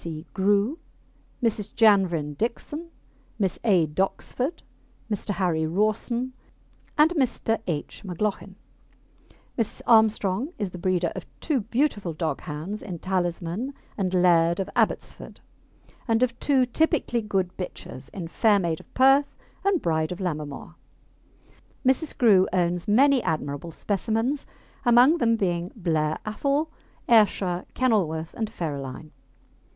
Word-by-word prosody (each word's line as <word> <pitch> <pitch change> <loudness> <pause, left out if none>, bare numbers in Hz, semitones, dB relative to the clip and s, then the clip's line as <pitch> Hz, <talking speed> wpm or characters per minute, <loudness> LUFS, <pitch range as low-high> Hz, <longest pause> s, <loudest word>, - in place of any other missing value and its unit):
C. 160 -1 -6
Grew, 205 - +2 0.6
Mrs. 215 -2 -1
Janvrin 185 -9 +3
Dickson, 295 - -4 0.5
Miss 195 -4 -1
A. 190 -8 +4
Doxford, 195 - -2 0.5
Mr. 210 0 -3
Harry 170 -4 0
Rawson, 215 +7 0 0.6
and 305 +2 +6
Mr. 250 -7 0
H. 155 -4 -4
McLauchin. 195 +1 -3 1.0
Mrs. 225 - -2
Armstrong 220 - +3
is 200 -4 -3
the 180 - -8
breeder 180 -2 0
of - - -7
two 300 -4 0
beautiful 225 - -1
dog 155 -2 -2
hounds 160 +8 -5
in 180 -4 -6
Talisman 185 - -2 0.2
and 190 -3 -1
Laird 170 -2 +4
of 195 - -3
Abbotsford, - - -1 0.7
and 225 +1 +3
of 240 -1 -1
two 270 -3 +3
typically 255 -2 +1
good 195 -4 -1
bitches 135 -7 -7
in 180 -4 -6
Fair 210 +5 +3
Maid 170 -4 -1
of - - -17
Perth 270 +2 +4 0.3
and 395 -4 +1
Bride 160 -1 0
of 180 - -5
Lammermoor. 150 -6 -4 1.1
Mrs. 265 +4 +1
Grew 200 -6 +5
owns 175 -1 0
many 265 +5 +5
admirable 155 -1 -3
specimens, 225 - -1 0.4
among 245 +7 +6
them 230 -3 +3
being 175 -4 -1
Blair 160 -6 0
Athol, 280 +8 -1 0.4
Ayrshire, 200 -6 +3
Kenilworth, 170 -11 +1
and 220 -2 -3
Ferraline. 150 - -5
200 Hz, 125 wpm, -25 LUFS, 170-240 Hz, 1.1 s, and